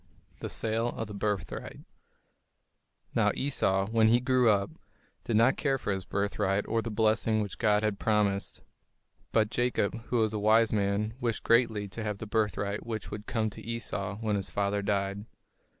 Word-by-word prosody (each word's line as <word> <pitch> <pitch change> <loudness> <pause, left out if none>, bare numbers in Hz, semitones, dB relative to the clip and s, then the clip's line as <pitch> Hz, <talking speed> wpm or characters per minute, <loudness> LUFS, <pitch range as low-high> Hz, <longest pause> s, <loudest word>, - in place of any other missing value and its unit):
THE - - -5
SALE 115 +1 -1
OF 110 -2 -4
A - - -7
BIRTHRIGHT 100 -2 -3 1.3
Now - - +3
Esau, 95 -8 +1
when 110 -1 +4
he 120 +2 +5
grew 125 -2 +3
up, 100 -2 +2 0.5
did 115 - 0
not 115 +5 +4
care 135 -2 +1
for 105 - -3
his 95 -2 -4
birthright 100 0 0
or 115 - +1
the 115 - -4
blessing 110 0 +2
which 105 -3 -4
God 105 -2 +3
had 105 -2 0
promised. 105 -2 0 0.7
But 110 -1 +2
Jacob, 120 -2 0
who 125 - -1
was 110 -1 +2
a 105 - -1
wise 110 +2 +4
man, 105 +1 0
wished 115 -3 -1
greatly 115 -3 +3
to 95 +5 -6
have 105 -2 -2
the 110 - -6
birthright 105 -1 -1
which 110 -2 -5
would 105 0 -7
come 110 -3 -1
to - - -10
Esau 100 -4 -4
when 110 -1 -1
his 95 -1 -4
father 100 0 0
died. 100 0 -1
110 Hz, 175 wpm, -29 LUFS, 100-115 Hz, 1.3 s, he